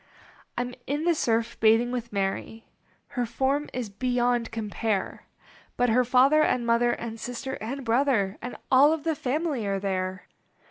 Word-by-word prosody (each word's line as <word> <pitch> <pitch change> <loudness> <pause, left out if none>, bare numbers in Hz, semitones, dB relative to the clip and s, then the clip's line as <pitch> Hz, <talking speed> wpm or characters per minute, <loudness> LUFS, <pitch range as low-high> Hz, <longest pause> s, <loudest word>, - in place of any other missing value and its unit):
I - - +1
m 250 0 -7
in 290 +3 -1
the 345 0 +3
surf 230 -5 0
bathing 225 +2 +4
with 240 -2 -4
Mary; 200 +3 -3 0.4
Her 245 -4 -2
form 270 +5 0
is 250 -2 -3
beyond 245 +1 0
compare; 215 -2 -3 0.5
But 245 0 +2
her 250 +3 +4
father 265 +5 +4
and 250 -5 +1
mother 235 +1 +3
And 230 -1 -6
sister 245 +3 -5
and 260 +5 -5
brother 230 -5 +1
And 245 - -6
all 280 +4 +6
of 320 -2 -4
the 325 0 +1
family 285 -2 -2
are 195 0 0
there. 185 -1 -3
245 Hz, 160 wpm, -26 LUFS, 225-265 Hz, 0.5 s, all